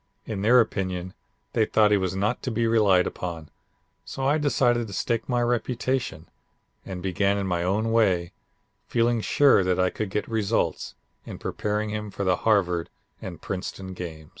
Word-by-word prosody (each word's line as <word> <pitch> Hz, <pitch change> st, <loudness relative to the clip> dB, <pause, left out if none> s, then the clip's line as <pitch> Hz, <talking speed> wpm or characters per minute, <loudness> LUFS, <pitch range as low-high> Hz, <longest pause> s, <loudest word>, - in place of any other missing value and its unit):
In 105 Hz, -3 st, -4 dB
their 120 Hz, +5 st, +6 dB
opinion 95 Hz, -5 st, -1 dB, 0.4 s
they -, -, +3 dB
thought 105 Hz, -1 st, +4 dB
he 105 Hz, -, +5 dB
was 95 Hz, -1 st, -2 dB
not 105 Hz, +5 st, 0 dB
to -, -, -3 dB
be 115 Hz, 0 st, 0 dB
relied 105 Hz, -5 st, +4 dB
upon, 85 Hz, -4 st, -5 dB, 0.5 s
so 135 Hz, -, -5 dB
I 145 Hz, +3 st, +3 dB
decided 120 Hz, -5 st, +2 dB
to 100 Hz, -, -9 dB
stake 115 Hz, +5 st, -1 dB
my 120 Hz, -1 st, +1 dB
reputation, 120 Hz, -4 st, -1 dB, 0.6 s
and 90 Hz, -2 st, -7 dB
began 100 Hz, +2 st, +1 dB
in 100 Hz, -, -2 dB
my 90 Hz, -2 st, -1 dB
own 105 Hz, +5 st, 0 dB
way, 95 Hz, -7 st, +2 dB, 0.6 s
feeling 120 Hz, 0 st, +1 dB
sure 140 Hz, -4 st, +4 dB
that 90 Hz, 0 st, 0 dB
I 90 Hz, 0 st, +2 dB
could 110 Hz, -3 st, -4 dB
get 105 Hz, +2 st, -2 dB
results, 110 Hz, -1 st, -1 dB, 0.3 s
in -, -, -8 dB
preparing 105 Hz, 0 st, -2 dB
him 105 Hz, 0 st, -4 dB
for 100 Hz, 0 st, -4 dB
the 90 Hz, -1 st, +2 dB
Harvard 90 Hz, -6 st, +1 dB, 0.3 s
and 85 Hz, -4 st, -8 dB
Princeton 95 Hz, 0 st, -5 dB
games. 80 Hz, -4 st, -8 dB
105 Hz, 170 wpm, -25 LUFS, 90-115 Hz, 0.6 s, their